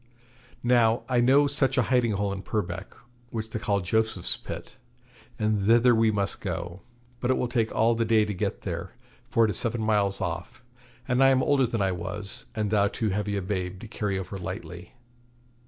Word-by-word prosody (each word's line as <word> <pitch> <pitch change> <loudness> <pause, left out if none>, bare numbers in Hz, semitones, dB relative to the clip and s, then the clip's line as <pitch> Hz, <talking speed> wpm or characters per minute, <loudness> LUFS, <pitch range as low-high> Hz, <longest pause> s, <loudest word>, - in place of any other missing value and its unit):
Now, 120 -2 +3
I 125 -2 +2
know 135 +4 +5
such 140 -1 +1
a 125 - +4
hiding 120 -3 +3
hole 100 0 -1
in 95 - -5
Purbeck, 95 -3 -4 0.3
which 110 -2 -5
they 110 - -3
call 105 -4 0
Joseph's 110 0 0
Pit, - - -8 0.6
and 105 -2 0
thither 120 +2 +6
we 115 -1 +4
must 100 -2 -1
go; 85 +2 -4 0.4
but 120 - -2
it 130 - +3
will 125 - 0
take 115 -2 0
all 115 +2 +4
the 115 0 0
day 110 -1 +3
to 105 - -3
get 90 - -3
there, - - -5 0.3
for 115 - +4
it 110 - 0
is 90 - +1
seven 115 0 -1
miles 100 -3 +2
off, 90 +5 -5 0.4
and 125 +2 +3
I 135 - +7
am 130 -1 +3
older 135 -3 +3
than 115 -3 -1
I 95 - +1
was, 100 +3 -6
and 105 -2 -1
thou 100 -2 +4
too 110 +1 -2
heavy 105 +1 -1
a 100 - -2
babe 95 -1 -3
to - - -8
carry 105 -3 -2
over 95 +1 -5
lightly.' 90 0 -7
110 Hz, 200 wpm, -27 LUFS, 100-120 Hz, 0.6 s, I